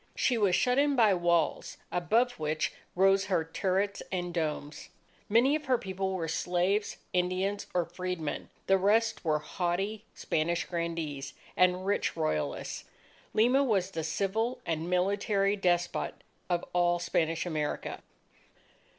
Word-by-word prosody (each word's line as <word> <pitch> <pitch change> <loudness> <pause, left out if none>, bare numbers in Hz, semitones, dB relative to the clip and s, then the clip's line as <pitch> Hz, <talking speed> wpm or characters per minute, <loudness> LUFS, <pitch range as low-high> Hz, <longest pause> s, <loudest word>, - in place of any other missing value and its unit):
She 250 - +2
was 200 -5 +3
shut 250 +5 +3
in 285 0 +3
by 220 -5 +5
walls 170 -3 +1
above 225 +8 +2
which 155 0 -1 0.2
rose 195 +1 +4
her 185 -4 +1
turrets 195 +4 -1
and 175 -1 -2
domes. 150 -3 -3 0.4
Many 240 +7 +4
of 310 - -4
her 255 -1 +3
people 190 -2 -3
were 165 -3 -2
slaves, 180 +5 0 0.2
Indians, 185 +3 0
or 175 -1 +1
freedmen; 175 -3 -4 0.2
the 195 0 +4
rest 220 +4 +2
were 155 -3 +2
haughty 190 +6 -2
Spanish 170 +2 0
grandees 165 -5 -4 0.2
and 180 +1 +3
rich 200 +1 0
royalists. 75 -1 -2 0.5
Lima 250 +6 +4
was 195 -7 +1
the 160 -3 -3
civil, 205 +9 -1
and 165 +1 -2
military, 195 +2 +2
despot 175 -3 0 0.3
of 175 -1 0
all 175 0 +3
Spanish 165 -1 0
America. 155 -4 -3
180 Hz, 135 wpm, -30 LUFS, 170-205 Hz, 0.5 s, by